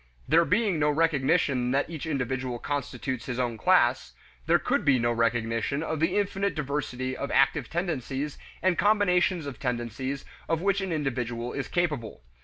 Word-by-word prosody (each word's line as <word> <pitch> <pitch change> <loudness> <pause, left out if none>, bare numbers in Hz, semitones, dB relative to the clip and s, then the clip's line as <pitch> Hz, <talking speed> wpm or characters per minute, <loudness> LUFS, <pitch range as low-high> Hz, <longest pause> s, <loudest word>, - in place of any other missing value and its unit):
There 165 +2 +5
being 200 -3 +1
no 150 0 +3
recognition 145 -4 +2
that 140 +1 +1
each 160 -1 -6
individual 130 -3 -2
constitutes 130 -2 -4
his 125 -2 -3
own 120 -2 -1
class, 130 -3 +3 0.3
there - - +5
could - - 0
be 140 -2 +4
no 120 0 +1
recognition 115 +4 0
of 160 -1 -2
the 170 +5 +1
infinite 200 -1 0
diversity 130 -3 -3
of 140 - -4
active 135 0 +2
tendencies 150 -5 -3 0.2
and 185 -2 +2
combinations 185 -5 +3
of 140 -2 -7
tendencies 125 +2 -3 0.2
of 165 -1 +1
which 195 +2 +1
an 190 -2 -3
individual 125 -5 -2
is 140 - -3
capable. 150 - -2
140 Hz, 160 wpm, -27 LUFS, 125-165 Hz, 0.3 s, There